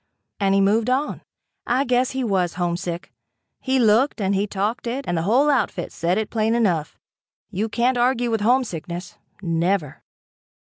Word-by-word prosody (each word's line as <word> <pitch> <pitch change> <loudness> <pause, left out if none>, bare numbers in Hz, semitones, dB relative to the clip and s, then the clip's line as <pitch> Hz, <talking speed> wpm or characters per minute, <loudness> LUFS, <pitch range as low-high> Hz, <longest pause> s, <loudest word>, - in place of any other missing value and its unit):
and 195 -1 +2
he 195 - +4
moved 215 +4 +2
on. 270 +4 -1 0.5
I 250 +3 +2
guess 250 0 +2
he 265 0 -3
was 185 -7 0
homesick. 175 0 -3 0.5
He 265 0 0
looked, 235 +3 +3
and 195 -1 0
he 200 +1 0
talked 210 +5 -2
it 260 +4 -3
and 175 - 0
the 165 - 0
whole 240 - +3
outfit 230 - 0
said 175 +3 -1
it 220 -1 -2
plain 220 0 +1
enough. 180 -10 0 0.5
You 210 +3 -2
can't 245 +3 +1
argue 245 -1 +1
with 225 -2 0
homesickness 185 -8 -1 0.2
never. 170 -2 -1
215 Hz, 160 wpm, -22 LUFS, 180-245 Hz, 0.5 s, he